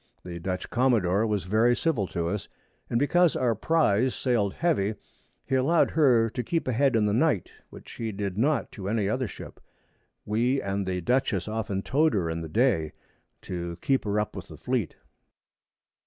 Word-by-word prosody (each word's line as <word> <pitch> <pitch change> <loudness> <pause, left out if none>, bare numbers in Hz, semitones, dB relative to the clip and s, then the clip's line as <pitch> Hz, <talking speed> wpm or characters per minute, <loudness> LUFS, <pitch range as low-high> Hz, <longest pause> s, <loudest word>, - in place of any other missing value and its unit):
The 85 -1 -6
Dutch 90 +2 -3
Commadore 115 -5 +2
was 105 -3 -1
very 110 +6 +3
civil 120 - 0
to 85 -2 -2
us, 100 +3 -3 0.4
and 115 - +1
because 175 +6 +3
our 125 -3 +2
Prize 130 -2 +2
sailed 110 -7 0
heavy, 110 - 0 0.5
he - - -5
allow'd 140 +6 +3
her 125 -8 +4
to 125 - -3
keep 165 0 -2
a - - +1
head 135 +1 +2
in 110 -2 +3
the 105 - +1
Night, 125 - +1 0.2
which - - -12
he 115 -1 -4
did 100 -2 -4
not 140 +8 +1
to 100 -1 -6
any 105 -2 0
other 125 +4 -1
Ship. - - -10 0.7
We 120 +6 +1
and 100 -2 -2
the 90 -1 -2
Dutchess 110 -3 0
often 105 -3 -3
tow'd 150 -1 +2
her 85 -5 0
in 80 0 -3
the 80 - -6
Day, 105 - +1 0.5
to 85 -2 -5
keep 135 -1 +1
her 105 0 0
up 105 - -3
with - - -7
the - - -11
Fleet. 120 - -2
110 Hz, 185 wpm, -27 LUFS, 95-130 Hz, 0.7 s, her